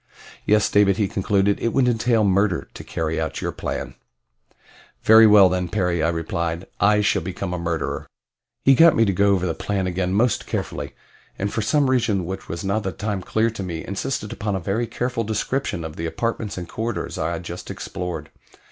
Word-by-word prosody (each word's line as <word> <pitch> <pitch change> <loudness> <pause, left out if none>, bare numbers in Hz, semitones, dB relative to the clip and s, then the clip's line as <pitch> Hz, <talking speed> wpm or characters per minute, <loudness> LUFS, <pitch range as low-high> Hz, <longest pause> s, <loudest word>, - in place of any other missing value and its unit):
"Yes, 105 0 +4
David," 100 -1 +3
he 105 - +1
concluded, 100 +1 +1
"it 115 - 0
would 130 -2 +3
entail 115 -1 +2
murder 100 -2 +1
to - - -9
carry 80 0 -2
out 80 - -3
your - - -2
plan." - - -5 1.1
"Very 110 0 +8
well 105 -2 +8
then, 90 0 -1
Perry." 90 -3 0
I 80 - +2
replied. 85 +1 -2
"I 105 +2 +4
shall 105 -3 +2
become 95 +1 -4
a 90 - -3
murderer." 85 -2 -3 0.6
He 135 - +7
got 165 +4 +6
me 115 - +4
to 100 - +1
go 100 +3 +3
over 95 -2 +2
the 85 - 0
plan 95 +3 -2
again 90 0 -1
most 115 +3 +1
carefully, - - -4 0.4
and 100 +1 -2
for 110 - 0
some 140 +6 +2
reason 115 -8 +1
which 95 +2 -6
was 85 - -4
not 100 +2 0
at 110 - -2
the 95 - -2
time 105 -2 -3
clear 110 +5 0
to 110 - -7
me 85 -4 -5
insisted 105 +2 -3
upon 105 -2 -2
a - - -1
very 100 +7 -1
careful 120 -1 -2
description 110 -3 -2
of 80 -1 -7
the 85 - -2
apartments 115 +2 -3
and 90 -1 -5
corridors 115 +5 -4
I - - -1
had - - -5
just - - -7
explored. 85 -4 -5
100 Hz, 200 wpm, -22 LUFS, 90-110 Hz, 1.1 s, Very